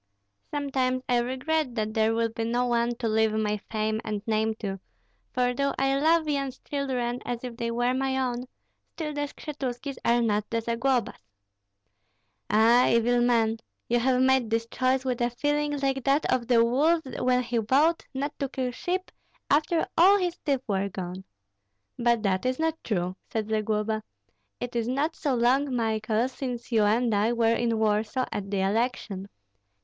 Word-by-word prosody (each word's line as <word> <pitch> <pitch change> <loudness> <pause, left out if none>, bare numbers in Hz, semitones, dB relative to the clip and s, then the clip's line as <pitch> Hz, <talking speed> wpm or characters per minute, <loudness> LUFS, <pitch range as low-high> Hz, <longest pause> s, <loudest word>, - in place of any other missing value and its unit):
Sometimes 260 -3 -1
I 245 -1 +3
regret 260 +2 -1
that 215 -1 -2
there 220 0 +2
will 230 0 +1
be 225 0 -4
no 240 +2 0
one 240 0 +1
to 235 -1 -3
leave 220 0 +2
my 210 -1 0
fame 215 0 -1
and 210 -2 -4
name 220 0 +1
to; 195 -3 -5 0.5
for 250 0 +1
though 275 +2 0
I 270 0 +2
love 320 +1 +3
Yan's 275 -3 -1
children 255 -4 -3
as 240 0 -4
if 245 -2 -6
they 235 -1 -3
were 245 +2 +1
my 265 0 0
own, 250 -1 -1 0.5
still 305 -2 -4
the 290 0 -2
Skshetuskis 275 -2 -5
are 235 0 +3
not 210 -2 0
the 230 - 0
Zaglobas." 235 +2 0 1.3
"Ah, 230 +4 +5
evil 240 +1 +3
man! 230 -2 +2 0.3
You 240 +1 +2
have 250 +1 +2
made 260 -3 +3
this 225 0 0
choice 260 0 +1
with 250 -2 -1
a 240 - +2
feeling 290 +4 -1
like 270 -1 -1
that 280 +2 +3
of 240 -2 -1
the 230 -2 +5
wolf 310 +7 +2 0.2
when 250 0 +2
he 235 -1 -1
vowed 285 +9 +2
not 280 +2 -3
to 275 -2 -1
kill 255 -2 -2
sheep 365 +8 -3 0.4
after 315 +3 +2
all 385 +4 +7
his 355 -3 -1
teeth 275 -4 0
were 200 -1 0
gone." 185 0 -6 0.7
"But 235 -2 +2
that 190 -2 +1
is 255 0 0
not 320 0 -1
true," 185 -3 -2
said 220 -1 -3
Zagloba. 215 0 0 0.6
"It 245 0 -5
is 230 -1 0
not 285 +6 0
so 280 -4 -1
long, 255 +3 +2
Michael, 220 0 0
since 250 -2 -6
you 220 -3 +4
and 225 +2 +2
I 210 +3 +2
were 230 -1 +3
in 230 -1 0
Warsaw 220 +4 +1
at 200 -1 -4
the 195 -1 0
election. 200 -1 -1
240 Hz, 175 wpm, -27 LUFS, 220-270 Hz, 1.3 s, all